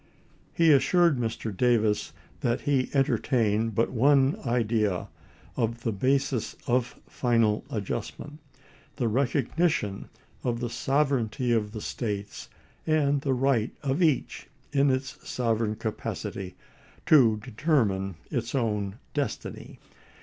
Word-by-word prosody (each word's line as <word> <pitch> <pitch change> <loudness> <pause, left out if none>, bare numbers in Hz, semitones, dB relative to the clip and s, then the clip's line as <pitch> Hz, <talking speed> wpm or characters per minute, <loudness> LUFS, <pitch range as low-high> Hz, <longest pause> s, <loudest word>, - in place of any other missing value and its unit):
He 165 -1 +4
assured 165 +1 +4
Mr. 115 -2 -3
Davis 110 -2 +2 0.3
that 120 +2 0
he 135 -3 +1
entertained 115 -5 +1
but 115 - +1
one 135 +3 +4
idea 110 -5 0 0.5
of 115 -1 -2
the 115 - 0
basis 130 +3 0
of 125 0 0
final 115 -4 +1
adjustment 145 +8 -5 0.3
— - - -28
the 120 - 0
recognition 130 - 0 0.3
of 120 -2 -1
the 120 -1 -2
sover 135 0 +1
eignty 120 0 0
of 105 -2 -1
the 110 -1 -6
States, 105 -4 -4 0.4
and 145 -3 +2
the 135 -2 0
right 125 -3 +1
of 140 +5 0
each 155 -7 +1 0.3
in 140 0 +4
its 130 0 -2
sov 115 -3 0
ereign 110 -2 -1
capacity 100 -4 -5 0.5
to 120 -8 +6
determine 105 - 0 0.2
its 120 -3 -2
own 105 -5 -1 0.2
destiny. 145 -2 -4
120 Hz, 120 wpm, -27 LUFS, 110-140 Hz, 0.5 s, to